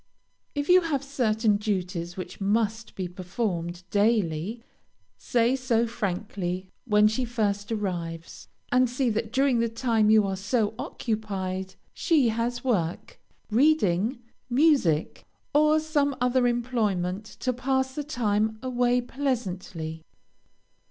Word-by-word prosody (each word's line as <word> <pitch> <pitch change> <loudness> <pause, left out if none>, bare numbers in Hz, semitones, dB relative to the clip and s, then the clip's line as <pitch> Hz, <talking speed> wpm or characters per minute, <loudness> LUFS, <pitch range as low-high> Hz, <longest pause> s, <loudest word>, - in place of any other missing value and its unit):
If 290 0 -1
you 365 +1 +7
have 295 -5 -1
certain 225 -6 +1
duties 185 -4 -3
which 185 - -7
must 220 +2 0
be 185 -2 -3
performed 180 -1 -3
daily, 205 -1 +1 0.5
say 240 +1 +1
so 245 -3 +1
frankly 190 -4 -3
when 210 -2 +5
she 220 +4 0
first 210 -3 -1
arrives, 170 -6 -4 0.2
and 250 0 +4
see 250 0 0
that 220 +1 -2
during 265 -2 +2
the 230 0 +1
time 225 -2 +1
you 215 -1 +6
are 195 -1 -1
so 210 +2 0
occupied 190 -4 -3 0.2
she 300 -9 +3
has 235 +2 -2
work, 180 -10 -1 0.3
reading, 235 - +3 0.3
music, 250 - +2 0.3
or 305 +1 +5
some 295 -3 0
other 250 0 +3
employment, 215 -6 0 0.2
to 255 - 0
pass 265 +1 0
the 295 - -3
time 220 -6 0
away 245 -1 +2
pleasantly. 190 - -3
225 Hz, 120 wpm, -26 LUFS, 195-255 Hz, 0.5 s, you